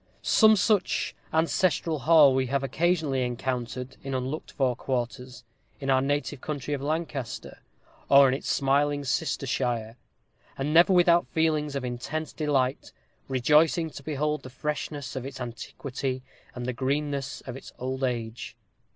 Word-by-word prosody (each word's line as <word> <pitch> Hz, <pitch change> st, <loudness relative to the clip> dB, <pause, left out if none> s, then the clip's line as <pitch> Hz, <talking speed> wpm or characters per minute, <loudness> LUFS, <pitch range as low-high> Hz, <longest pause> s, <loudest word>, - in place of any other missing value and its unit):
Some 220 Hz, -1 st, +6 dB
such 200 Hz, -1 st, +1 dB, 0.2 s
ancestral 165 Hz, 0 st, +1 dB
hall 150 Hz, -1 st, +6 dB
we 130 Hz, 0 st, +1 dB
have 140 Hz, +2 st, 0 dB
occasionally 155 Hz, -1 st, +1 dB
encountered, 125 Hz, +1 st, -3 dB
in 135 Hz, -1 st, -3 dB
unlooked 130 Hz, +4 st, -4 dB
for 130 Hz, -4 st, 0 dB
quarters, 125 Hz, 0 st, -4 dB, 0.4 s
in 135 Hz, -1 st, -1 dB
our 130 Hz, 0 st, +4 dB
native 145 Hz, 0 st, -1 dB
county 145 Hz, -1 st, -4 dB
of 140 Hz, -, -2 dB
Lancaster, 150 Hz, -4 st, -4 dB, 0.5 s
or 140 Hz, 0 st, +8 dB
in 130 Hz, -, +2 dB
its 135 Hz, -, -4 dB
smiling 145 Hz, +1 st, +2 dB
sister 155 Hz, +1 st, -1 dB
shire; 120 Hz, -3 st, -2 dB, 0.6 s
and 145 Hz, +3 st, -1 dB
never 170 Hz, +3 st, +6 dB
without 175 Hz, -1 st, +5 dB
feelings 155 Hz, -3 st, 0 dB
of 135 Hz, -2 st, -2 dB
intense 135 Hz, +6 st, -4 dB
delight, 140 Hz, -4 st, 0 dB, 0.4 s
rejoicing 150 Hz, +5 st, +3 dB
to 140 Hz, -, -9 dB
behold 150 Hz, +1 st, -1 dB
the 130 Hz, -, -10 dB
freshness 145 Hz, 0 st, -4 dB
of 130 Hz, -, -3 dB
its 135 Hz, -1 st, -7 dB
antiquity, 130 Hz, +2 st, -5 dB, 0.3 s
and 125 Hz, -1 st, -5 dB
the 125 Hz, -, -2 dB
greenness 140 Hz, +1 st, -2 dB
of 125 Hz, -, -8 dB
its 135 Hz, -, -10 dB
old 130 Hz, +1 st, -4 dB
age. 120 Hz, -3 st, -3 dB
135 Hz, 145 wpm, -27 LUFS, 130-150 Hz, 0.6 s, or